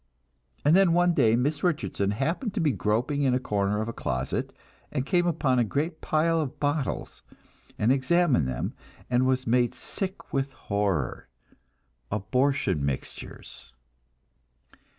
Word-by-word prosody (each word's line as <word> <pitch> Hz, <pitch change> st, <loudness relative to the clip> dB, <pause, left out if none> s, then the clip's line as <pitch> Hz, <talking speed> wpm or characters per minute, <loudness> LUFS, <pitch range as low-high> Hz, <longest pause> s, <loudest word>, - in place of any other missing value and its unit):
And 150 Hz, +3 st, +6 dB
then 190 Hz, -3 st, +5 dB
one 175 Hz, 0 st, +4 dB
day 115 Hz, -7 st, +4 dB
Miss 145 Hz, +5 st, 0 dB
Richardson 150 Hz, -, 0 dB
happened 165 Hz, -, -1 dB
to -, -, 0 dB
be 155 Hz, -3 st, +3 dB
groping 115 Hz, -, 0 dB
in 130 Hz, -3 st, +3 dB
a -, -, +1 dB
corner 105 Hz, -3 st, 0 dB
of -, -, -6 dB
a 115 Hz, -, -4 dB
closet, 65 Hz, -8 st, -2 dB, 0.4 s
and 135 Hz, -3 st, -1 dB
came 175 Hz, +1 st, +2 dB
upon 135 Hz, -6 st, +2 dB
a -, -, +4 dB
great 155 Hz, -, -2 dB
pile 165 Hz, +1 st, +2 dB
of 140 Hz, -4 st, -5 dB
bottles, 145 Hz, -1 st, -2 dB, 0.6 s
and 110 Hz, +4 st, +3 dB
examined 135 Hz, -, +3 dB
them, 65 Hz, -2 st, -3 dB, 0.4 s
and 125 Hz, +1 st, +3 dB
was 130 Hz, 0 st, +1 dB
made 120 Hz, 0 st, +2 dB
sick 190 Hz, 0 st, -6 dB
with 135 Hz, 0 st, -1 dB
horror 100 Hz, -, -2 dB, 0.8 s
abortion 125 Hz, -, +1 dB
mixtures. 70 Hz, -2 st, -5 dB
130 Hz, 140 wpm, -27 LUFS, 105-155 Hz, 0.8 s, And